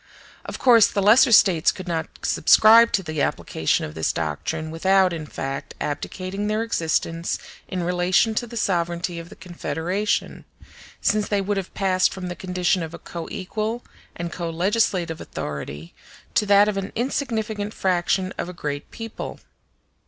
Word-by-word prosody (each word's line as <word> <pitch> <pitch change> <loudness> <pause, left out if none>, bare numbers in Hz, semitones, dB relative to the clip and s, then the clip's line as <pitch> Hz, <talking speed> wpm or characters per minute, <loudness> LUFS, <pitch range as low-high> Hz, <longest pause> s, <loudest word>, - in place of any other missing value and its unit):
Of - - -6
course 235 -5 +6
the 205 - -2
lesser 230 +6 +6
States 190 -6 +5
could 185 -1 -9
not 165 -2 -2 0.2
subscribe 230 +2 +6
to 195 - +1
the 155 -3 -3
application 80 - 0
of 75 - -8
this 80 0 0
doctrine 120 - -3
without, 190 +2 +3
in 155 -2 -5
fact, 135 0 -5
abdicating 185 +7 -4
their 215 +1 0
existence 165 -4 -1 0.3
in 180 -1 -3
relation 180 +5 +2
to 240 +2 -2
the 235 - -8
sovereignty 175 -3 -1
of 165 0 -10
the 210 - -12
Confederation; 175 +4 -2 0.6
since 210 -1 +1
they 205 - +1
would 200 +1 -1
have 190 -2 -4
passed 185 -2 +2
from 180 -1 -5
the 175 - -5
condition 180 0 0
of 165 0 -5
a - - -8
co 170 -1 -7
equal 215 +5 -4 0.3
and 170 0 -5
co 170 -2 -4
legislative 175 -2 0
authority 75 +2 -6 0.4
to 210 - +2
that 200 +1 +6
of 210 -2 -1
an 195 +1 -3
insignificant 220 -5 -2
fraction 185 -1 0
of 175 - -3
a - - -7
great 145 -4 -5
people. 225 -1 -7
185 Hz, 160 wpm, -23 LUFS, 165-210 Hz, 0.6 s, course